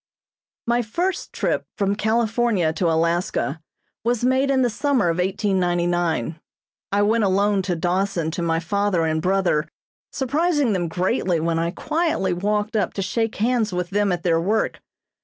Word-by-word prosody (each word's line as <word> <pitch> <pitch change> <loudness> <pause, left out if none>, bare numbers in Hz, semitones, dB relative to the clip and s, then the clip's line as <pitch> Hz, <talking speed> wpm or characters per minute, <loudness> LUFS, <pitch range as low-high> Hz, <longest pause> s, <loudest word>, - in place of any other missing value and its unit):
My 240 +1 +2
first 345 - -2
trip - - -1
from 200 -1 +1
California 220 -5 +1
to 170 +1 0
Alaska 165 -2 0 0.4
was 240 +1 0
made 260 +2 +2
in 265 -1 +3
the 245 - +2
summer 250 - +1
of 165 - 0
1899. 175 - 0 0.5
I 200 +1 +2
went 220 +2 +2
alone 200 +1 +2
to 185 -1 -2
Dawson 175 -1 -1
to 170 - -4
my 165 -1 +1
father 185 0 0
and 160 0 0
brother, 180 -4 +1 0.4
surprising 290 -2 +1
them 175 -3 -1
greatly 180 +1 0
when 165 +1 0
I 165 0 0
quietly 310 - -1
walked 210 +4 -1
up 205 -4 0
to 195 - -1
shake 225 +3 -1
hands 225 -1 +1
with 180 +1 -2
them 205 0 +1
at 175 -1 -2
their 165 -2 +2
work. 210 +6 0
195 Hz, 160 wpm, -22 LUFS, 175-225 Hz, 0.5 s, in